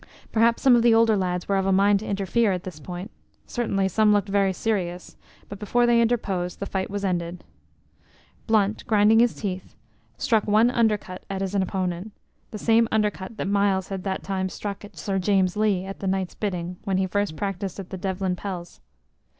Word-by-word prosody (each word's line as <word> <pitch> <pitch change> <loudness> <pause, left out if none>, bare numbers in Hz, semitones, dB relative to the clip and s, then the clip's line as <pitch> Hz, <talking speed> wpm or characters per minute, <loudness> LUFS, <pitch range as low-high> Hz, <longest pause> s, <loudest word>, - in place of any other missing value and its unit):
Perhaps 230 +1 +2
some 260 -2 +7
of 235 - +4
the 230 -1 +5
older 225 -1 +4
lads 180 -2 -2
were 200 - +1
of 190 0 0
a - - +3
mind 200 +1 +4
to 215 - -8
interfere 200 +3 +1
at 180 -1 -2
this 180 -5 -8
point, 180 +7 -7 0.3
certainly 195 -5 -1
some 215 +3 +3
looked 205 -1 +2
very 195 -1 +2
serious, 180 -3 -3 0.3
but 200 - -9
before 240 +3 +2
they 235 -1 +4
interposed, 195 -7 -1
the 200 - -3
fight 190 -1 -3
was 200 0 -3
ended. 175 -1 -2 1.0
Blunt, 215 -1 +2
grinding 215 0 +5
his 240 0 +3
teeth, 190 -3 -5 0.4
struck 225 -6 +1
one 220 +4 +4
undercut 215 -6 0
at 195 -1 -3
his 195 0 -2
opponent 190 0 -2 0.4
the 215 - -6
same 225 +2 +3
undercut 210 -1 -1
that - - -3
Myles 200 -2 +1
had 190 -2 -4
that 190 -1 -3
time 190 -1 -2
struck 200 +1 -6
at 205 - -13
Sir 195 -1 -2
James 190 -1 +2
Lee 205 -3 +1
at 195 0 -7
the 195 - -4
knight's 190 -1 -1
bidding 180 -3 -4
when 195 -1 0
he 190 - +1
first 205 -2 -1
practised 195 +1 -4
at 190 - -8
the 190 - -4
Devlen 190 -1 -1
pels. 180 -2 -7
195 Hz, 195 wpm, -24 LUFS, 185-215 Hz, 1.0 s, some